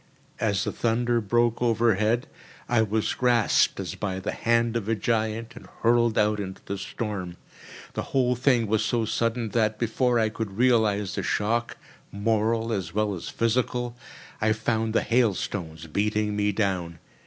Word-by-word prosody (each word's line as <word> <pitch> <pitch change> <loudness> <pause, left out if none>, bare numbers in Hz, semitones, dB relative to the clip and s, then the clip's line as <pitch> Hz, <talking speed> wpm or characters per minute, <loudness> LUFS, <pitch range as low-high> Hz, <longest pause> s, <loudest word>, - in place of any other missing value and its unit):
As 100 -2 +1
the 105 - -2
thunder 120 +1 +1
broke 120 +2 +1
overhead, 115 -1 +2 0.4
I 120 -2 +3
was 110 0 0
grasped 120 -3 +2
as - - -4
by 95 -2 -3
the - - -3
hand 115 0 +1
of 110 -2 -2
a 115 - +2
giant 110 +1 -1
and - - -12 0.2
hurled 120 -1 +3
out 105 0 +2
into 95 -1 -5
the 100 0 -4
storm. 95 -4 -5 0.6
The - - -2
whole 125 -2 +2
thing 125 -2 +2
was 110 0 +1
so 115 -2 0
sudden 115 +1 -1
that, 110 -1 +1
before 120 +2 +1
I 110 -1 +2
could 105 -2 -5
realise 110 -5 +2
the - - -2
shock, 115 +3 -1 0.3
moral 110 +2 0
as 95 -3 -4
well 105 -1 +1
as 90 - -6
physical, 120 +1 -1 0.5
I 110 0 +3
found 110 0 -1
the - - +3
hailstones 95 -8 -1
beating 105 +5 0
me 105 0 +1
down. 95 -5 -1
110 Hz, 160 wpm, -26 LUFS, 105-115 Hz, 0.6 s, I